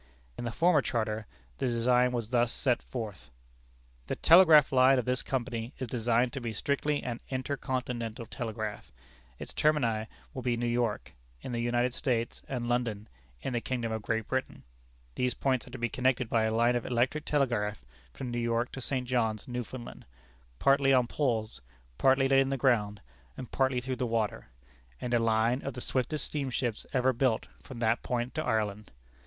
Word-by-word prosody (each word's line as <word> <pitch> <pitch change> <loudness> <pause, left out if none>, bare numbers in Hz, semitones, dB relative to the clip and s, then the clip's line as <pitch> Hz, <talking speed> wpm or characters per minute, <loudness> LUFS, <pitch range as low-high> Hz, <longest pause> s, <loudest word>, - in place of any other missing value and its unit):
In - - -5
the 120 - -2
former 170 +2 +4
charter, 110 -4 -2 0.3
the - - 0
design 125 +1 +3
was 120 -2 -3
thus 120 -1 +2
set 125 -3 +1
forth: 110 - -7 0.8
"The - - -1
telegraph 160 -4 +7
line 130 0 +6
of 125 - 0
this 125 0 +1
company 120 -2 -3
is 130 - -4
designed 120 +1 +1
to 140 - -4
be 115 -2 -3
strictly 145 +5 -1
an 120 -1 -4
'Inter 130 +2 -2
Continental 125 -3 -3
Telegraph.' 110 -3 -5 0.5
Its - - -8
termini 120 -8 +1 0.3
will 130 - -5
be 120 -1 0
New 120 - -1
York, 120 -2 -1 0.3
in - - -6
the 120 - -2
United 120 +1 +1
States, 120 -4 -1
and 125 -3 -3
London, 115 -3 -1 0.3
in 130 - -2
the 120 - 0
kingdom 120 -3 -2
of 110 0 -2
Great 110 +1 -2
Britain; 130 0 -3 0.5
these 125 - 0
points 130 -3 0
are - - -10
to 130 - -7
be 120 -1 0
connected 130 0 +1
by 115 -1 +2
a 110 - +1
line 120 +2 +3
of 120 - 0
electric 130 +5 0
telegraph 110 - 0 0.3
from 120 - -6
New 120 - -2
York 115 +1 0
to 135 - -7
St. 130 -1 -2
John's, 115 -4 0
Newfoundland, 125 - -6 0.5
partly 135 - +4
on 125 -2 +5
poles, 115 - -1 0.4
partly 135 0 +4
laid 135 0 +5
in 135 - 0
the 135 - -1
ground, 105 -6 +1 0.4
and 125 - -7
partly 130 -2 +1
through 130 +1 -4
the 125 - -1
water, 115 -2 -1 0.5
and 125 0 -3
a 120 - +4
line 115 +3 +2
of 140 -2 -5
the - - -5
swiftest 130 +5 -1
steamships 130 -5 -2
ever 130 -1 +2
built 120 -2 +1 0.2
from 130 - -10
that 115 0 +1
point 120 0 -2
to 155 - -2
Ireland. 105 -3 -1
120 Hz, 180 wpm, -30 LUFS, 115-130 Hz, 0.8 s, telegraph